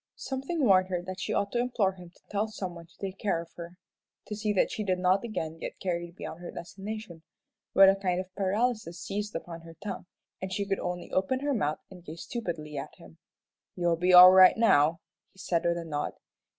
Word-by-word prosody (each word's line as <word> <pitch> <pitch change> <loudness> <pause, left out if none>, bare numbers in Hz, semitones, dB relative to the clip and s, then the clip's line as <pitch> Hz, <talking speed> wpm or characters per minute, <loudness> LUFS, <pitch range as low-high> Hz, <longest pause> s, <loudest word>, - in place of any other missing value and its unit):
Something 275 +3 -2
warned 185 -3 +5
her 180 -2 -2
that 185 +1 -7
she - - -3
ought 200 0 0
to 240 - 0
implore 240 -5 +1
him 180 -2 -13
to 175 - -27
tell 210 +1 0
some 190 -4 -5
one 170 -1 -11
to 165 - -25
have 190 - -4
a - - -31
care 195 -5 0
of 165 0 -9
her 170 +1 -9 0.5
to 210 - -5
see 210 0 -1
that 200 - +2
she 215 - -3
did 185 -2 0
not 185 +2 +2
again 165 -8 -4
get - - -7
carried 175 -2 -3
beyond 165 - -7
her 175 - -7
destination, 195 0 -7 0.5
but 195 0 +9
a 195 - +6
kind 185 -2 -1
of 185 0 -7
paralysis 205 -2 -1
seized 210 0 -4
upon 165 0 -6
her 165 0 -13
tongue, 195 0 -7 0.3
and 190 0 -4
she 200 +1 -1
could 195 -1 -1
only 180 0 -4
open 225 +8 0
her 285 0 0
mouth 155 - 0
and 180 -2 -12
gape 160 -1 -9
stupidly 165 -8 -5
at - - -8
him. 80 -1 -16 0.6
"You'll 175 -1 +1
be 180 +2 +1
all 180 0 +11
right 185 +2 +8
now," 165 -8 +4 0.3
he - - -26
said, 175 -2 -1
with 170 0 +2
a 170 - -5
nod. 150 -2 -3
185 Hz, 225 wpm, -29 LUFS, 170-205 Hz, 0.6 s, all